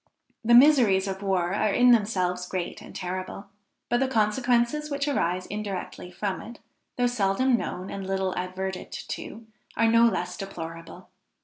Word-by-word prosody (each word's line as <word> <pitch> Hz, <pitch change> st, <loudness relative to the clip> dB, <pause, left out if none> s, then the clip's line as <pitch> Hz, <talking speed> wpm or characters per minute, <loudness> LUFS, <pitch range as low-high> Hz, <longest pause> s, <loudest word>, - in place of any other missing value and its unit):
The 235 Hz, +1 st, +5 dB
miseries 240 Hz, -8 st, +6 dB
of 190 Hz, 0 st, -4 dB
war 190 Hz, -2 st, 0 dB
are 210 Hz, +1 st, +1 dB
in 245 Hz, +4 st, +5 dB
themselves 185 Hz, -5 st, +1 dB
great 180 Hz, -2 st, -4 dB
and -, -, -12 dB
terrible, 185 Hz, +2 st, -5 dB, 0.4 s
but 240 Hz, -, +1 dB
the 270 Hz, -, +2 dB
consequences 245 Hz, +5 st, +1 dB
which 280 Hz, 0 st, -2 dB
arise 185 Hz, -10 st, 0 dB
indirectly 200 Hz, -3 st, -5 dB
from 190 Hz, +1 st, -3 dB
it, 235 Hz, 0 st, -10 dB, 0.4 s
though 245 Hz, -, +1 dB
seldom 245 Hz, +2 st, +2 dB
known 185 Hz, -5 st, -4 dB
and 195 Hz, -, -5 dB
little 190 Hz, -1 st, -1 dB
adverted 185 Hz, +1 st, -4 dB
to, 225 Hz, +2 st, -7 dB, 0.3 s
are 230 Hz, -, +3 dB
no 230 Hz, +1 st, +5 dB
less 180 Hz, -4 st, -2 dB
deplorable. 165 Hz, -4 st, -8 dB
200 Hz, 150 wpm, -26 LUFS, 185-235 Hz, 0.4 s, miseries